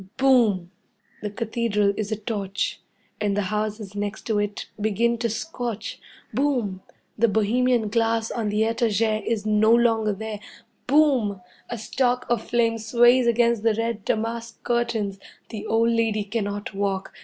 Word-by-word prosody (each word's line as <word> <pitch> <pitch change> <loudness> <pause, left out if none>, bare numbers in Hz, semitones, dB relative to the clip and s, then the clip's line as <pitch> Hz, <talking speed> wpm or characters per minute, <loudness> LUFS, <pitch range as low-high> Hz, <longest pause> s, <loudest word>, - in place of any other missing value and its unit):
Boom! 225 -10 +3 0.5
The 210 - -3
Cathedral 210 -2 0
is 215 0 -3
a - - +1
torch, 205 -2 -3 0.4
and 205 -1 0
the 205 -1 -1
houses 210 -1 -3
next 205 +1 -3
to 220 -2 0
it 205 0 -3
begin 230 +3 +1
to 235 0 0
scorch. 235 -2 -4 0.3
Boom! 245 -9 0 0.4
The 235 - +5
bohemian 230 +2 +2
glass 225 0 +1
on 220 -3 -2
the 210 +1 +1
'etagere' 225 -1 +1
is 220 -3 -1
no 215 +1 +4
longer 225 -2 +3
there. 215 +1 -5 0.5
Boom! 260 -8 +3 0.3
A 240 - -4
stalk 250 +3 0
of 235 -2 +2
flame 230 -1 +1
sways 240 +3 +4
against 235 -1 +3
the 225 -1 +2
red 225 -1 -2
damask 230 +2 -3
curtains. 235 -5 -1 0.3
The 215 -3 -6
old 230 +1 +3
lady 225 -2 +1
cannot 205 -1 -3
walk. 195 -1 -2
220 Hz, 145 wpm, -24 LUFS, 205-235 Hz, 0.5 s, The